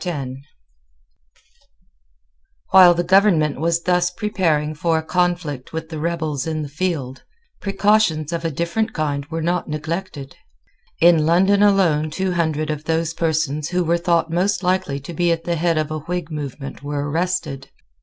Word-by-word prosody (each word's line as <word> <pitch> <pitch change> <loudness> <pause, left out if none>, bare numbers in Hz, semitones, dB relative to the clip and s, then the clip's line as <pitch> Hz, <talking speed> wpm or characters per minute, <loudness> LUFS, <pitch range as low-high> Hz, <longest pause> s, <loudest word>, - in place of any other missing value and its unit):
While 180 -2 +8
the 175 - 0
government 175 -6 +3
was 170 +1 0
thus 180 0 +2
preparing 175 -6 -1
for 160 +2 0
a 160 - -2
conflict 170 -5 -1
with 160 0 -5
the 160 -2 -6
rebels 160 -4 -2
in 155 -1 -2
the 145 - -7
field, 145 -5 -3 0.4
precautions 195 -6 +1
of 170 0 -3
a 165 - 0
different 170 +8 -2
kind 145 -2 -2
were 160 0 -4
not 175 0 -1
neglected. 155 -1 -5 0.7
In 165 -2 +5
London 190 +4 +4
alone 180 -7 +3
two 190 +4 -2
hundred 155 -3 -1
of 150 0 -5
those 165 0 0
persons 155 -3 -1
who 180 0 0
were 170 +1 +1
thought 170 -1 +1
most 185 +3 0
likely 180 -6 0
to 145 +5 -9
be 175 +1 +1
at 165 0 -1
the 170 0 -1
head 165 0 +1
of 155 0 -1
a 155 - -3
Whig 175 +1 -4
movement 140 -3 -6
were 145 0 -3
arrested. 160 -4 -2
165 Hz, 155 wpm, -20 LUFS, 150-180 Hz, 0.7 s, While